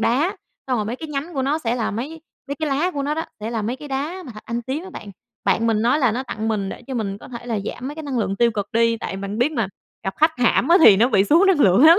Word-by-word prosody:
đá, 295 Hz, -, +1 dB, 0.3 s
xong 255 Hz, -2 st, +1 dB
rồi 210 Hz, -, 0 dB
mấy 230 Hz, +4 st, -3 dB
cái 315 Hz, +3 st, -7 dB
nhánh 300 Hz, +3 st, -4 dB
của 265 Hz, -, 0 dB
nó 285 Hz, +4 st, +1 dB
sẽ 240 Hz, -6 st, -1 dB
là 235 Hz, -3 st, -1 dB
mấy 280 Hz, +10 st, -5 dB, 0.3 s
mấy 280 Hz, -, -2 dB
cái 310 Hz, +1 st, -2 dB
lá 290 Hz, +6 st, +1 dB
của 285 Hz, -5 st, -3 dB
nó 295 Hz, +2 st, -1 dB
đó 320 Hz, -, -1 dB, 0.2 s
sẽ 215 Hz, +2 st, -3 dB
là 225 Hz, -2 st, -2 dB
mấy 235 Hz, +5 st, -2 dB
cái 295 Hz, +2 st, -10 dB
đá 295 Hz, +8 st, -3 dB
mà 250 Hz, -, -8 dB
thạch 215 Hz, -, -12 dB
anh 235 Hz, +1 st, -3 dB
tím 275 Hz, +8 st, -4 dB
á 380 Hz, -, -9 dB
bạn. 210 Hz, -, -9 dB, 0.3 s
Bạn 205 Hz, +4 st, +2 dB
mình 220 Hz, -2 st, +2 dB
nói 245 Hz, +6 st, +3 dB
là 255 Hz, -6 st, +3 dB
nó 250 Hz, +4 st, -2 dB
tặng 220 Hz, -3 st, -4 dB
mình 205 Hz, -3 st, -1 dB
để -, -, -7 dB
cho 270 Hz, -, -5 dB
mình 200 Hz, -4 st, -2 dB
có -, -, -12 dB
thể 240 Hz, -1 st, -8 dB
là 230 Hz, -3 st, -1 dB
giảm 250 Hz, +4 st, -5 dB
mấy 290 Hz, -, -6 dB
cái 315 Hz, -, -7 dB
năng 275 Hz, -4 st, -2 dB
lượng 200 Hz, -3 st, -1 dB
tiêu 235 Hz, +2 st, +4 dB
cực 205 Hz, -3 st, -3 dB
đi, 230 Hz, 0 st, +3 dB
tại -, -, -4 dB
bạn 200 Hz, +2 st, -4 dB
biết 260 Hz, +6 st, +2 dB
mà 230 Hz, -8 st, 0 dB, 0.4 s
gặp 195 Hz, -, -2 dB
khách 315 Hz, +1 st, +4 dB
hãm 245 Hz, +1 st, +3 dB
á 340 Hz, -, +7 dB
thì 215 Hz, -10 st, +9 dB
nó 230 Hz, +5 st, +4 dB
bị 200 Hz, -6 st, +4 dB
xuống 330 Hz, -, +5 dB
năng 375 Hz, -6 st, +4 dB
lượng 195 Hz, +5 st, +6 dB
lắm! 335 Hz, +4 st, +9 dB
245 Hz, 320 wpm, -22 LUFS, 220-295 Hz, 0.4 s, thì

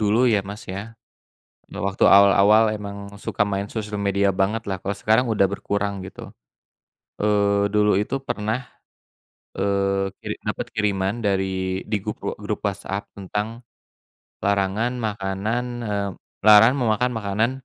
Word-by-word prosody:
dulu, 110 Hz, +4 st, +3 dB
ya, 105 Hz, -, +3 dB
Mas, 105 Hz, +3 st, -7 dB
ya. 100 Hz, +4 st, -6 dB, 0.8 s
Nah, -, -, -6 dB
waktu 100 Hz, 0 st, +2 dB
awal-awal 100 Hz, +2 st, +6 dB
emang 100 Hz, -1 st, -7 dB, 0.2 s
suka 105 Hz, -, 0 dB
main 100 Hz, 0 st, -2 dB
sosial 105 Hz, -2 st, -4 dB
media 100 Hz, 0 st, +2 dB
banget 100 Hz, +4 st, 0 dB
lah, 95 Hz, -, -1 dB
kalau 100 Hz, +2 st, -3 dB
sekarang 110 Hz, +5 st, +2 dB
udah 105 Hz, -4 st, +3 dB
berkurang, 100 Hz, 0 st, -2 dB
gitu. -, -, -10 dB, 0.9 s
Eee, 100 Hz, -1 st, +2 dB
dulu 105 Hz, -2 st, +3 dB
itu 105 Hz, -, -2 dB
pernah, 110 Hz, +2 st, -2 dB, 1.0 s
eee, 100 Hz, 0 st, +1 dB
kiri -, -, -5 dB
dapet -, -, -2 dB
kiriman 100 Hz, -2 st, 0 dB
dari 95 Hz, -2 st, -1 dB
di 105 Hz, -, +2 dB
gup 105 Hz, -, -3 dB
eee, -, -, -3 dB
grup 105 Hz, 0 st, -3 dB
WhatsApp 100 Hz, 0 st, -3 dB
tentang 105 Hz, +4 st, -4 dB, 0.8 s
larangan 100 Hz, +4 st, +1 dB
makanan, 105 Hz, +1 st, -2 dB, 0.2 s
eee, 100 Hz, -1 st, -1 dB, 0.4 s
larang 110 Hz, +4 st, +8 dB
memakan 125 Hz, -1 st, +1 dB
makanan 110 Hz, +1 st, 0 dB
100 Hz, 135 wpm, -23 LUFS, 100-110 Hz, 1.0 s, larang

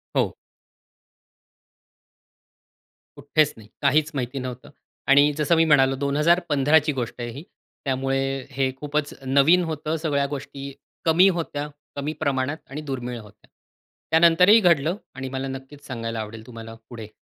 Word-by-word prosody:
हो. -, -, +1 dB, 2.8 s
कुठेच 145 Hz, +1 st, +1 dB
नाही, 110 Hz, -2 st, -14 dB
काहीच 155 Hz, +1 st, +2 dB
माहिती 130 Hz, +1 st, -3 dB
नव्हतं. 125 Hz, -1 st, -7 dB, 0.4 s
आणि 145 Hz, +2 st, +6 dB
जसं 150 Hz, +2 st, +2 dB
मी 165 Hz, 0 st, +4 dB
म्हणालो, 135 Hz, -3 st, +4 dB
2015ची 150 Hz, +1 st, +2 dB, 0.2 s
गोष्ट 120 Hz, -1 st, -4 dB
आहे 120 Hz, -, -4 dB
ही. 140 Hz, +7 st, -9 dB, 0.4 s
त्यामुळे 135 Hz, 0 st, -1 dB
हे 135 Hz, 0 st, 0 dB
खूपच 150 Hz, +1 st, -2 dB
नवीन 140 Hz, +7 st, +4 dB
होतं. 155 Hz, -1 st, -3 dB
सगळ्या 140 Hz, -3 st, +1 dB
गोष्टी 140 Hz, 0 st, -7 dB, 0.3 s
कमी 170 Hz, +4 st, +6 dB
होत्या, 150 Hz, -3 st, -3 dB, 0.3 s
कमी 145 Hz, +2 st, -3 dB
प्रमाणात 140 Hz, +1 st, 0 dB
आणि 145 Hz, +3 st, -6 dB
दुर्मिळ 125 Hz, -2 st, -4 dB
होत्या. 105 Hz, -1 st, -17 dB, 0.6 s
त्यानंतरही 170 Hz, +6 st, +6 dB
घडलं 170 Hz, -3 st, +3 dB, 0.2 s
आणि 130 Hz, 0 st, -5 dB
मला 135 Hz, +1 st, -4 dB
नक्कीच 135 Hz, +2 st, -9 dB
सांगायला 115 Hz, -3 st, -4 dB
आवडेल 110 Hz, +1 st, -7 dB
तुम्हाला 115 Hz, -2 st, -9 dB
पुढे. 115 Hz, -3 st, -8 dB
140 Hz, 130 wpm, -24 LUFS, 130-155 Hz, 2.8 s, आणि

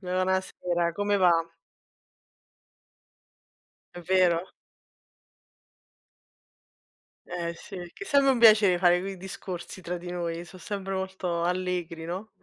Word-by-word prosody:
Buonasera, 185 Hz, -2 st, -1 dB
come 205 Hz, +3 st, 0 dB
va? 180 Hz, -3 st, +5 dB, 2.6 s
È 175 Hz, -, -7 dB
vero. 180 Hz, -1 st, +2 dB, 2.8 s
Eh 170 Hz, -1 st, -3 dB
sì, 195 Hz, -, -12 dB, 0.2 s
che -, -, -8 dB
è -, -, -14 dB
sempre 280 Hz, -4 st, +4 dB
un 260 Hz, -, +2 dB
piacè 215 Hz, -5 st, +7 dB
fare 175 Hz, 0 st, +4 dB
quei 195 Hz, +1 st, -5 dB
discorsi 185 Hz, 0 st, -7 dB
tra 180 Hz, 0 st, -4 dB
di 175 Hz, 0 st, -7 dB
noi. 170 Hz, -1 st, -3 dB
Sò 175 Hz, +2 st, -13 dB
sempre 195 Hz, +1 st, -4 dB
molto 190 Hz, -2 st, -2 dB
allegri, 180 Hz, -2 st, -2 dB
no? 185 Hz, +6 st, -5 dB
180 Hz, 110 wpm, -27 LUFS, 175-190 Hz, 2.8 s, piacè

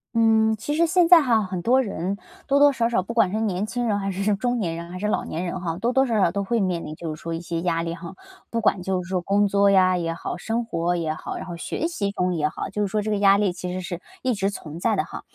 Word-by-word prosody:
嗯， 220 Hz, -1 st, +4 dB
其 290 Hz, +7 st, -3 dB
实 335 Hz, +1 st, +3 dB
现 350 Hz, 0 st, +4 dB
在 345 Hz, -1 st, +8 dB
哈 230 Hz, -6 st, +2 dB
很 185 Hz, -2 st, -4 dB
多 255 Hz, +6 st, +3 dB
人， 195 Hz, -2 st, -3 dB, 0.3 s
多 280 Hz, -, +3 dB
多 285 Hz, 0 st, +6 dB
少 235 Hz, -3 st, +1 dB
少- 230 Hz, -6 st, +1 dB
不 230 Hz, +5 st, -6 dB
管 225 Hz, -6 st, +3 dB
是 215 Hz, -, -1 dB
年 205 Hz, -1 st, -1 dB
轻 245 Hz, 0 st, -2 dB
人 205 Hz, -2 st, +1 dB
还 195 Hz, 0 st, -2 dB
是 195 Hz, +2 st, 0 dB
中 245 Hz, +4 st, -1 dB
年 175 Hz, -7 st, -2 dB
人， 170 Hz, +1 st, -7 dB
还 180 Hz, -, -7 dB
是 205 Hz, +3 st, -2 dB
老 210 Hz, -, 0 dB
年 170 Hz, +3 st, -4 dB
人 180 Hz, +1 st, -4 dB
哈- 165 Hz, -2 st, -3 dB
多 235 Hz, +6 st, 0 dB
多 265 Hz, -, +4 dB
少 225 Hz, -3 st, +1 dB
少 180 Hz, -4 st, +3 dB
都 200 Hz, +2 st, -2 dB
会 230 Hz, +3 st, 0 dB
面 180 Hz, -4 st, -1 dB
临 155 Hz, -, -7 dB
就 160 Hz, -1 st, -5 dB
是 155 Hz, -, -16 dB
说 165 Hz, -, -5 dB
一 -, -, -4 dB
些 170 Hz, -1 st, -3 dB
压 165 Hz, -1 st, 0 dB
力 165 Hz, 0 st, -3 dB
哈， 170 Hz, 0 st, -9 dB, 0.3 s
不 230 Hz, -, -1 dB
管 205 Hz, -4 st, +2 dB
就 185 Hz, 0 st, -1 dB
是 -, -, -11 dB
说 185 Hz, -1 st, -1 dB
工 200 Hz, +3 st, +2 dB
作 200 Hz, 0 st, +3 dB
呀 185 Hz, -2 st, +4 dB
也 165 Hz, -1 st, -2 dB
好、 -, -, -5 dB
生 225 Hz, +6 st, -2 dB
活 175 Hz, -6 st, -1 dB
也 165 Hz, -3 st, -1 dB
好， 155 Hz, -, -6 dB
然 -, -, -6 dB
后 175 Hz, -, -6 dB
学 315 Hz, -, -2 dB
习 215 Hz, -12 st, -2 dB
中 180 Hz, -2 st, 0 dB
也 150 Hz, -3 st, 0 dB
好， -, -, -5 dB
就 210 Hz, -, -3 dB
是 205 Hz, -, +1 dB
说 210 Hz, +2 st, -1 dB
这 215 Hz, -, -2 dB
个 210 Hz, -, +1 dB
压 200 Hz, 0 st, +5 dB
力 200 Hz, -3 st, +1 dB
其 180 Hz, 0 st, -5 dB
实 185 Hz, +1 st, -3 dB
是 175 Hz, -1 st, -6 dB, 0.2 s
一 255 Hz, -, +1 dB
直 195 Hz, -2 st, 0 dB
存 165 Hz, -5 st, -8 dB
在 220 Hz, +4 st, +1 dB
的 -, -, +1 dB
哈。 -, -, -8 dB
195 Hz, 325 characters per minute, -24 LUFS, 175-225 Hz, 0.3 s, 在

